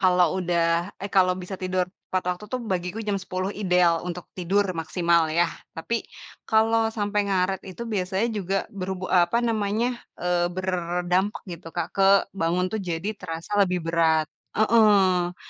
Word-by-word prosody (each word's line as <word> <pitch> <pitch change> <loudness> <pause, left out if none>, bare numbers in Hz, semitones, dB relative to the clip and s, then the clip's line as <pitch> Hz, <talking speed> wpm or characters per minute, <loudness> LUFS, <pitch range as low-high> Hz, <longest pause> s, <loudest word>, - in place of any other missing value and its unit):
kalau 180 -1 +3
udah 170 +1 +1
eh 200 - -4
kalau 185 -2 +4
bisa 185 +1 -6
tidur 185 -1 -1 0.2
tepat 185 -1 -1
waktu 210 - -12
tuh, 255 - -1
bagiku 185 +1 -2
jam 205 -1 0
10 185 0 -3
ideal 180 -4 +2
untuk 180 0 -5
tidur 190 +3 +1
maksimal 170 0 +1
ya, 170 +2 +3 0.3
tapi 230 +8 -2 0.5
kalau 225 0 +3
sampai 205 0 0
ngaret 190 0 +1
itu 190 +6 -7
biasanya 195 -1 -1
juga 195 -2 -1 0.2
berhubu 190 -1 -4
apa 185 +7 +3
namanya, 230 +2 0 0.2
eee, 175 0 +1
berdampak 180 +1 -1
gitu, 170 -3 -8
Kak, 170 -1 -1
ke 195 -1 +3 0.3
bangun 180 -1 0
tuh 220 - -1
jadi 175 0 -3
terasa 165 -2 -7
lebih 180 -4 +1
berat, 165 -1 +3 0.3
heeh. 200 -5 +4
185 Hz, 150 wpm, -25 LUFS, 175-205 Hz, 0.5 s, kalau